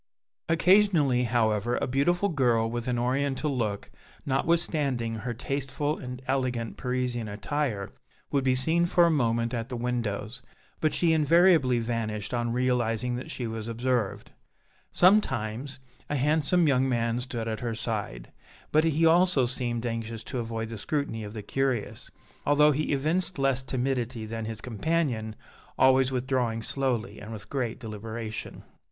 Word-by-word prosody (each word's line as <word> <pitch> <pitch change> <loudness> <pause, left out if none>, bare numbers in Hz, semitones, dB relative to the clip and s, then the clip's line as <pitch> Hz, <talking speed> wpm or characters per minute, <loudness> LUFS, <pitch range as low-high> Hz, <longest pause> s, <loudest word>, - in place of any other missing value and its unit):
Occasionally, 165 -7 +4
however, 115 0 +1
a - - 0
beautiful 175 +10 +1
girl, 120 -7 +2
with 120 +1 -4
an 125 -1 0
oriental 135 +3 0
look 105 -5 -2 0.3
notwithstanding 140 -5 0
her 120 +2 -4
tasteful 140 +4 -2
and 125 0 -7
elegant 130 -4 -1
Parisian 125 -3 -2
attire, 105 0 -2 0.4
would 140 -2 +1
be 130 -1 +3
seen 165 +6 +2
for 175 0 +4
a 170 - +3
moment 115 -4 +1
at 115 0 -3
the 125 - -4
windows, 120 -1 -3 0.4
but 155 - +1
she 165 -2 +3
invariably 160 -4 +4
vanished 115 -2 -3
on 120 -1 0
realizing 125 -1 0
that 125 - -7
she 125 - -4
was 110 -1 -5
observed. 115 -2 -1 0.6
Sometimes, 130 - +2 0.3
a 145 - -1
handsome 155 +4 +2
young 135 -1 +3
man 115 -1 0
stood 120 -2 -4
at 110 -1 -2
her 115 -2 -3
side, 105 - -4 0.4
but 155 +1 +4
he 165 0 +2
also 170 -4 +4
seemed 120 -2 -2
anxious 115 -1 -4
to 130 - -4
avoid 115 -1 -4
the 115 -2 -6
scrutiny 140 -4 -2
of 105 +1 -8
the 105 - -5
curious, 130 0 -2 0.3
although 150 +1 +5
he 150 +2 -1
evinced 160 +6 0
less 135 -2 +2
timidity 125 -3 -2
than 115 0 -5
his 110 -1 -5
companion, 120 -2 -1 0.4
always 130 0 +4
withdrawing 125 -3 -1
slowly 120 -7 -2
and 105 +2 -9
with 110 -3 -9
great 125 -4 -2
deliberation. 110 0 -6
125 Hz, 145 wpm, -27 LUFS, 115-140 Hz, 0.6 s, although